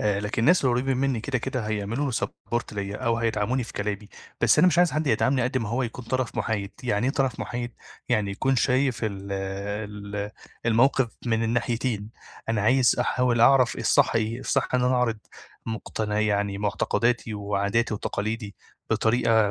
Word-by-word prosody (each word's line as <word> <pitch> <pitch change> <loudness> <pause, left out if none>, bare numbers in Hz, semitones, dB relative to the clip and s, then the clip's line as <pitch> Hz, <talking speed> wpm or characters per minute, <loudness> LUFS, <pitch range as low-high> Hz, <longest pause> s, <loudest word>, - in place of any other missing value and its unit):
آآ 105 -1 +1
لكن 105 +2 -2
الناس 170 +1 +4
اللي 125 -2 +3
قريبين 130 +1 0
مني 130 -3 0
كده 125 +1 -1
كده 125 -2 -3
هيعملوا 110 +6 -1
لي - - -5
support 120 +1 -3
ليَّ، 100 -1 -4
أو 115 0 0
هيدعَموني 115 +2 0
في - - -10
كلامي. 105 0 -3 0.3
بس - - +4
أنا 185 - +7
مش 175 - +1
عايز 175 -1 +4
حد 155 0 -1
يدعَمني 130 +2 +2
قد 130 +1 0
ما 115 -3 -3
هو 125 +3 0
يكون 120 +1 -5
طَرَف 130 0 -2
مُحايد، 100 -3 -1
يعني 120 -1 0
إيه 135 - +1
طرَف 135 -4 0
مُحايد؟ 120 0 -4 0.4
يعني 100 -2 +1
يكون 130 +6 0
شايف 130 0 +2
ال 100 -1 -4
ال 100 +1 -4 0.4
الموقِف 120 +2 +3 0.2
من 115 -1 +1
الناحيتين. 115 -2 -1 0.4
أنا 110 -2 +1
عايز 125 +3 +4
أحاوِل 125 -1 +1
أعرَف 130 0 +5
الصحّ - - +3
إيه، 115 +3 -1
الصحّ 135 0 0
إن 125 - +3
أنا 125 +1 +3
أعرض 120 -3 +1 0.5
مقتن 110 -1 -3
يعني 105 -2 +1
معتقداتي 105 +3 0
وعاداتي 105 +2 0
وتقاليدي 105 +1 -3 0.4
بطريقة 110 -2 +3
115 Hz, 170 wpm, -25 LUFS, 105-125 Hz, 0.5 s, أنا